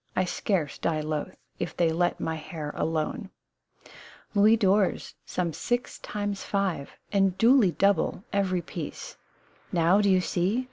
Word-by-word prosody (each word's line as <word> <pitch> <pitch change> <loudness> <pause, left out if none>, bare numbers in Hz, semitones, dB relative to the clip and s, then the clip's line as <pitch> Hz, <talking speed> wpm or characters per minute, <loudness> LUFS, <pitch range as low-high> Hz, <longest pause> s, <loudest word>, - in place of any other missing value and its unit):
I 185 - +2
scarce 180 -4 -1
die 160 -2 0
loth 155 +3 -4 0.2
If - - -4
they 165 -2 +3
let 175 +2 0
my 160 - -2
hair 155 -1 -6
alone! 165 +7 -2 0.5
" - - -19
Louis 215 +2 +5
d'or, 200 -2 +3 0.3
some 175 -3 -2
six 240 - -2
times 205 -1 -4
five, 190 -8 -2 0.2
And 195 -2 +2
duly 230 -6 +5
double, 195 -1 +1
every 185 -3 +1
piece. 165 -2 -7 0.6
Now, 175 +4 +4
do 200 - +3
you 185 -1 +5
see 185 +6 0
185 Hz, 145 wpm, -27 LUFS, 165-200 Hz, 0.6 s, Louis